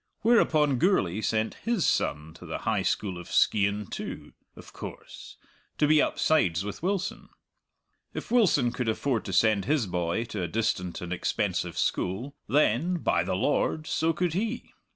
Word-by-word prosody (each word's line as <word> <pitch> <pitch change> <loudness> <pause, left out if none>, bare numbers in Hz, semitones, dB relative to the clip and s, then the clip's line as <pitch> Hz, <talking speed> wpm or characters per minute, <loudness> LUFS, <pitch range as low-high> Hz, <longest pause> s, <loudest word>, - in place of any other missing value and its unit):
Whereupon 155 - +3
Gourlay 110 - +2
sent 110 +1 0
his 230 -8 0
son 75 +2 0
to - - -12
the - - -3
High - - +1
School 95 -4 -1
of 85 - -10
Skeighan 100 0 +2
too, - - -7 0.2
of - - -13
course, - - -10 0.4
to 150 - +3
be 150 0 +5
upsides 95 - +1
with 105 - -6
Wilson. 195 +2 -2 0.8
If - - -7
Wilson 175 - +4
could 125 -1 -2
afford 115 +1 -1
to - - -4
send 105 +1 +3
his 145 -5 +1
boy 90 +3 -1
to 100 - -4
a 85 - -1
distant 90 -3 -2
and 90 0 -4
expensive 90 -1 -2
school, 115 +10 -1
then, 150 +5 +2
by 170 - +1
the - - -2
Lord, 155 0 0
so 160 +1 +1
could 175 +1 -1
he! 225 +6 -3
115 Hz, 160 wpm, -27 LUFS, 95-160 Hz, 0.8 s, be